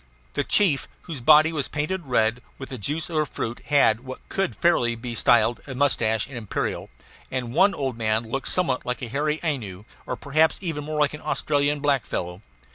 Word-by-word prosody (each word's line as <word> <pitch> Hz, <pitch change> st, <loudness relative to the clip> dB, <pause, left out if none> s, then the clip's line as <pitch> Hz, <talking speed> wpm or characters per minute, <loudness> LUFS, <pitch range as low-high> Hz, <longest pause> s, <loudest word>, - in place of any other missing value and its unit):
The 145 Hz, -, 0 dB
chief, 165 Hz, -4 st, +2 dB, 0.2 s
whose 155 Hz, -7 st, -6 dB
body 155 Hz, +5 st, +6 dB
was 145 Hz, -4 st, -1 dB
painted 155 Hz, +2 st, -3 dB
red 120 Hz, -1 st, +1 dB, 0.2 s
with 130 Hz, -, -8 dB
the 130 Hz, -, -6 dB
juice 150 Hz, +9 st, 0 dB
of 160 Hz, -, -2 dB
a 155 Hz, -, +2 dB
fruit, 120 Hz, -2 st, -4 dB
had 140 Hz, -7 st, +4 dB
what 130 Hz, +1 st, -10 dB
could 195 Hz, -2 st, -1 dB
fairly 125 Hz, -9 st, +2 dB
be 120 Hz, +1 st, -6 dB
styled 120 Hz, +1 st, +3 dB
a 135 Hz, -, -6 dB
mustache 115 Hz, -6 st, +2 dB
and 135 Hz, -, -11 dB
imperial; 110 Hz, -4 st, -3 dB, 0.4 s
and 125 Hz, -2 st, -3 dB
one 200 Hz, +7 st, +4 dB
old 135 Hz, -4 st, -2 dB
man 110 Hz, 0 st, +1 dB
looked 135 Hz, +4 st, -3 dB
somewhat 135 Hz, -9 st, +1 dB
like 125 Hz, +1 st, -3 dB
a 120 Hz, -, -4 dB
hairy 150 Hz, +5 st, -1 dB
Ainu, 110 Hz, -, -3 dB, 0.2 s
or -, -, -2 dB
perhaps 155 Hz, +3 st, +2 dB
even 160 Hz, -6 st, -4 dB
more 155 Hz, 0 st, -3 dB
like 150 Hz, 0 st, +2 dB
an 150 Hz, -, -8 dB
Australian 145 Hz, 0 st, 0 dB
black 140 Hz, -3 st, +1 dB
fellow. 90 Hz, +2 st, -4 dB
140 Hz, 200 wpm, -24 LUFS, 120-155 Hz, 0.4 s, body